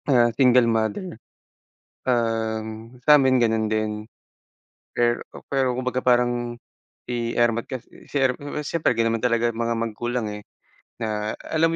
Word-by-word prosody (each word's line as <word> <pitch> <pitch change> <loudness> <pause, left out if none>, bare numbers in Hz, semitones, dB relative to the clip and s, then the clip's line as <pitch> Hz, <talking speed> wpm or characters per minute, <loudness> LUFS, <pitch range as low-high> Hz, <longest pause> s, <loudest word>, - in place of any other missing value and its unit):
Ah, 120 -3 +4
single 125 -1 +5
mother. 115 - -1 0.9
Um, 115 -1 -2
samin 135 -4 +6
ganun 110 -2 +1
din. 105 -1 -1 0.9
Per, 120 0 +1
o - - -10
pero 135 -2 +1
kumbaga 125 0 -2
parang 120 -1 +1 0.5
si 120 -1 -2
ermat 115 -1 +2
kasi, 130 -3 -9
si 145 - -2
er, 130 -1 +2 0.2
siyempre, 150 -2 0
ganun 115 0 +1
naman 115 - -11
talaga 120 -1 +2
mga 115 0 -1
magulang, 115 0 -2
eh. 105 0 -7 0.5
Na 110 -2 -3
alam 165 +1 +1
120 Hz, 135 wpm, -24 LUFS, 110-125 Hz, 0.9 s, samin